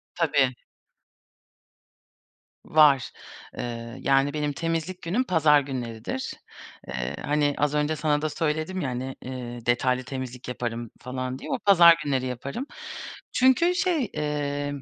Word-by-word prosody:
Tabii. 140 -6 +2 2.1
Var, 145 -4 +5 0.5
ııı, 115 0 -5
yani, 135 +1 +3
benim 150 -1 -1
temizlik 165 +4 -2
günüm 190 +10 0
pazar 160 - +4
günleridir. 125 -2 -4 0.6
Iıı, 65 +2 -3
hani, 145 0 +1
az 150 0 +1
önce 150 +1 +1
sana 150 -1 +1
da 155 - 0
söyledim, 160 +4 -1
ya, 140 - -1
hani, 130 +2 -4
eee, 120 -2 -7
detaylı 125 +1 +2
temizlik 130 -1 -6
yaparım 120 -2 -4
falan 130 +1 -4
diye, - - -8
o 265 - 0
pazar 175 -5 +8
günleri 135 -3 0
yaparım. 135 - -4 0.7
Çünkü, 260 +8 +4
şey, 335 - +1
emm, 145 -1 -2
145 Hz, 125 wpm, -26 LUFS, 125-155 Hz, 2.1 s, pazar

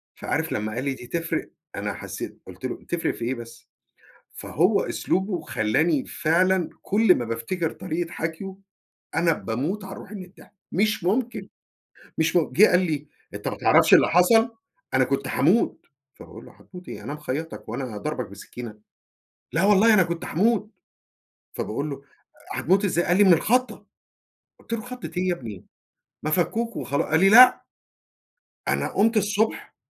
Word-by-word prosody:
فعارف - - -2
لما 105 +1 -2
قال 125 +3 -3
لي 140 -1 -1
دي 125 -2 -11
تفرق 165 +4 -3 0.3
أنا - - -3
حسيت - - -7
قُلت - - -9
له: - - -5
"تفرق 175 -1 -1
في 115 - -5
إيه 130 +3 -1
بس؟" 115 -1 -12 0.6
فهو - - +1
أسلوبه 190 -2 -1
خلّاني 145 +3 0
فعلًا 180 +2 +1
كل 205 -2 +4
ما 120 - -2
بافتكر 115 +10 -2
طريقة 170 0 -4
حكيه 170 +4 -5 0.6
أنا 170 -1 +3
باموت 150 - -3
على 195 0 -8
روحي 210 - -10
من 190 - -7
الضحك 180 - -19 0.2
مش 210 +1 +1
ممكن، 230 +7 -1 0.7
مش 160 +2 +1
م 170 -3 +2
جه 210 +5 +7
قال 180 - +4
لي: 155 -5 -2 0.3
"أنت - - -6
ما - - -3
تعرفش - - +4
اللي - - +7
حصل؟ 225 +7 +4 0.4
أنا 130 0 +4
كنت 135 +1 -1
هاموت" 180 +11 +1 0.3
فباقول - - -12
له: - - -14
"هتموت 180 0 -13
إيه؟ - - -8
أنا - - -5
مخيطك 150 +1 -5
هو - - -3
أنا 125 -6 -5
ضاربك 140 +1 -4
بسكينة!" 105 +3 -9 0.7
"لا 165 - +1
والله 210 +2 +5
أنا 200 -3 +6
كنت 170 -1 -4
هاموت" 210 +4 +1 0.8
فباقول 140 +8 -3
له: 140 -1 -7 0.5
"هتموت 195 +5 +2
إزاي؟" 175 -2 +1
قال 175 - +2
لي: 205 - +6
"من 190 -3 +7
الخضة" 250 +10 +1 0.7
قلت - - -14
له: 230 - 0
"خضة 250 +1 -8
إيه 185 +1 0
يا 180 - +2
ابني؟ 110 - -9 0.6
ما 155 - -2
فكوك 225 +8 0
وخلا" 140 - -1
قال 160 +1 +3
لي: 195 - +6
"لأ" 250 +5 +8 1.1
"أنا - - 0
قمت 225 +3 +3
الصبح 210 +2 0
175 Hz, 165 wpm, -24 LUFS, 140-200 Hz, 1.1 s, لأ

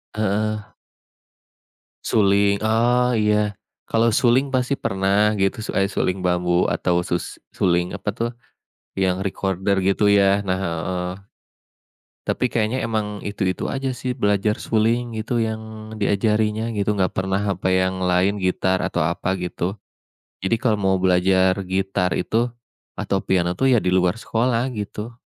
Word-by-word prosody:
Heeh. 110 0 0 1.4
Suling? 100 -1 +3
Ah 120 +3 +2
iya, 105 -1 +1 0.3
kalau 115 +1 +2
suling 130 +4 +3
pasti 130 +1 +1
pernah 100 -1 +1
gitu 95 +3 0
suai 95 -2 0
suling 95 -1 -1
bambu 90 -1 +1
atau 90 -1 +1
sus 85 0 -3 0.2
suling 90 +1 +1
apa, 100 +1 -4
tuh, 115 +2 -2 0.7
yang 95 0 +1
recorder 95 0 -1
gitu, 100 +2 +3
ya, 100 0 +4
nah 95 -1 0
heeh. 90 +1 -2 1.2
Tapi - - -1
kayaknya 115 +2 0
emang 105 -2 -2
itu-itu 95 -2 -2
aja, 135 -1 -2
sih, 125 -1 -3
belajar 105 +2 +1
suling 115 +2 +1
gitu 110 - -5
yang 110 0 -3 0.4
diajarinnya 105 +2 +1
gitu 105 -1 0
nggak 95 -2 +1
pernah 95 +1 -1
apa 95 +1 -2
yang 95 0 +1
lain 95 +2 +1
gitar 95 0 +1
atau 95 -4 -1
apa 90 +3 -1
gitu. 90 +3 -3 0.7
Jadi 105 +4 +2
kalau 115 -4 +2
mau 95 0 +3
belajar 95 +1 +3
gitar 95 0 -1
itu 115 +6 0 0.5
atau 100 - 0
piano, 90 -1 +1
tuh, 135 +6 +2
ya, 120 - +5
di 90 - -4
luar 90 +3 +2
sekolah 115 +2 0
gitu. 105 +2 -6
100 Hz, 140 wpm, -22 LUFS, 95-110 Hz, 1.4 s, ya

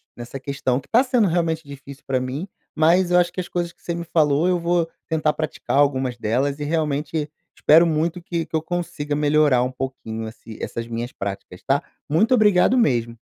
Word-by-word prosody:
nessa 120 +3 -7
questão, 135 -2 -1
que 135 - -23
tá 235 - +5
sendo 250 -5 +2
realmente 165 -2 0
difícil 140 0 -11
pra 130 -1 0
mim. 130 +7 -4 0.3
Mas, 170 +3 +4
eu 180 - +5
acho 175 -1 +1
que - - -5
as 175 - -8
coisas 175 -1 -2
que - - -35
você 170 - -3
me 170 - -4
falou 155 -1 +2
eu 180 -1 +2
vou 170 -1 +1 0.2
tentar 155 -2 +1
praticar 155 -3 -2
algumas 130 -3 +2
delas 130 +6 0
e - - -3
realmente 150 -1 -1 0.3
espero 160 +3 +6
muito 165 +2 -1
que 170 -1 -3
que - - -6
eu 160 - +1
consiga 160 -3 -3
melhorar 145 -3 +3
um 125 - -2
pouquinho 125 -4 -5
assi 110 0 -11
essas 115 0 -4
minhas 120 +1 -4
práticas, 95 -2 -6
tá? 140 +1 +1 0.3
Muito 215 - +3
obrigado 215 0 +4
mesmo. 120 - +1
150 Hz, 200 wpm, -22 LUFS, 130-170 Hz, 0.3 s, espero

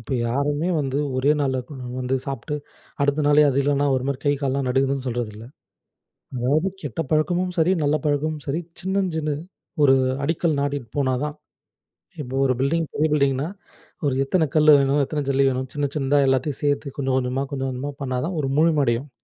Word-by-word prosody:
இப்ப 115 +4 -7 0.2
யாருமே 145 +6 0
வந்து 135 0 -1 0.2
ஒரே 135 +3 +2
நாள்ல 130 -2 0
கொ - - -10
ம் 125 -1 -7
வந்து 130 +1 -1
சாப்ட்டு, 135 +2 -4 0.5
அடுத்த 145 +2 +2
நாளே 150 +1 +6
அது 135 - 0
இல்லன்னா 145 0 +1
ஒரு 130 - 0
மாரி 135 -2 -1
கை, 145 - +3
கால்லாம் 135 0 0
நடுங்குதுன்னு 135 +1 0
சொல்றதில்ல. 115 -3 -4 0.9
அதாவது, 145 +9 +1
கெட்ட 145 +1 -3
பழக்கமும் 175 +4 +1
சரி, 165 +3 +3
நல்ல 145 +1 +2
பழக்கமும் 150 +1 0
சரி 155 +5 -1 0.2
சின்னஞ், 190 -1 0
சின்ன 150 -2 -1 0.5
ஒரு 135 -1 +6 0.3
அடிக்கல் 160 -1 0
நாட்டிட்டு 140 -5 -2
போனா 130 -2 +2
தான். 150 0 -5 0.9
இப்போ 130 -1 -6
ஒரு 130 - +3
பில்டிங் 160 +4 +1
பெரிய 155 +2 +2
பில்டிங்னா, 140 0 +1 0.6
ஒரு 140 - +2
எத்தன 160 +2 +2
கல்லு 155 0 +6
வேணும்? 140 +1 +2
எத்தன 150 0 -3
ஜல்லி 135 0 +3
வேணும்? 130 0 -2
சின்ன, 145 -1 0
சின்னதா 140 +1 +2
எல்லாத்தையும் 135 +2 0
சேர்த்து, 145 -1 0
கொஞ்சம் 130 -1 0
கொஞ்சமா, 130 +1 -1
கொஞ்சம் 135 -1 -2
கொஞ்சமா 135 +3 -4
பண்ணா 130 -1 -1
தான், 175 +1 -3
ஒரு 135 - -2
முழுமை 160 -2 +4
அடையும். 120 +5 -1
140 Hz, 180 wpm, -23 LUFS, 130-150 Hz, 0.9 s, நாளே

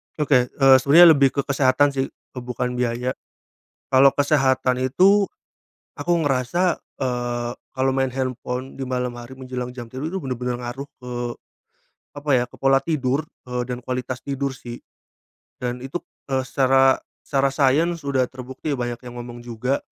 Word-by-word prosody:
Oke, 135 -5 +3
eee, 135 +1 +5
sebenarnya 160 +6 +8
lebih 140 -3 +5
ke 140 - +2
kesehatan 140 +1 +3
sih, 135 -1 -1
eee, 125 - -12
bukan 125 0 -3
biaya. 125 +1 0 0.8
Kalau 135 +1 +6
kesehatan 135 -3 +2
itu, 195 +10 +4 0.7
aku 160 +4 -3
ngerasa, 145 +7 +1 0.2
eee, 120 -2 -2 0.3
kalau 130 +1 +2
main 135 0 +1
handphone 130 0 -4
di - - -9
malam 125 -1 -2
hari 120 +2 -10
menjelang 125 -1 -5
jam 125 -1 -8
tidur 130 +7 -5
itu 190 - -3
bener-bener 125 -1 -3
ngaruh 125 +3 -6
ke, 125 -1 -9 1.1
apa 145 +1 -4
ya, 125 -2 +4
ke - - -16
pola 135 0 +3
tidur, 140 -1 -1 0.2
eee, 125 -1 -3
dan 125 -1 -3
kualitas 125 0 -4
tidur 140 -1 -2
sih. 120 0 -9 0.8
Dan 125 0 -4
itu, 135 +6 -4 0.3
eee, 130 -1 +1
secara 135 0 +3 0.2
secara 135 -1 0
sains 155 +5 +2
udah 135 -2 +1
terbukti 130 +4 -6
banyak 120 -2 -3
yang 120 - -8
ngomong 120 0 -8
juga, 120 +3 -1
130 Hz, 155 wpm, -22 LUFS, 125-140 Hz, 1.1 s, sebenarnya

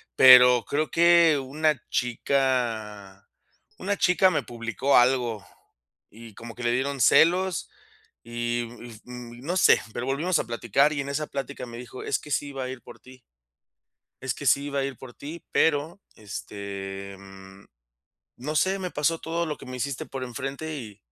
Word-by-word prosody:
Pero 125 -2 +8
creo 155 +6 -1
que 170 -3 +5
una 150 0 0
chica 115 -6 -1 0.5
una 200 +2 -2
chica 185 +1 +4
me 155 - -1
publicó 120 +3 -1
algo 120 -4 +2 0.7
y 115 -1 -13
como 115 0 -9
que 125 - -10
le 120 - +2
dieron 135 +1 -1
celos 180 +8 +3 0.6
y, 120 0 -2 0.4
mm, 125 - -12 0.3
mm, - - -13
no 175 +4 -1
sé, - - +5
pero 125 - -4
volvimos 160 +7 +1
a - - -2
platicar 120 +5 +1
y 140 - -2
en 140 - -6
esa 150 +2 -2
plática 140 -1 -6
me 120 -1 -9
dijo: 125 +1 -9
"es - - -1
que 150 - -13
sí 145 - -1
iba 135 -1 -5
a - - -5
ir 130 -1 -8
por - - -13
ti" 130 0 -16 1.1
es 130 - -1
que 145 - -9
sí 140 +1 +3
iba 140 -1 -2
a 135 - 0
ir 135 -3 -6
por 130 -2 -11
ti, 155 +7 -9
pero, 160 +4 +1 0.2
este, 100 -2 -7
mm, 95 0 -14 0.7
no 150 +5 -5
sé, 190 +5 +2
me 185 -2 -4
pasó 160 +2 0
todo 170 +1 -3
lo 150 -2 -4
que - - -13
me 130 0 -7
hiciste 135 +1 -3
por 135 -1 -7
enfrente, 135 +5 -5
y 110 -7 -9
130 Hz, 175 wpm, -25 LUFS, 120-150 Hz, 1.1 s, Pero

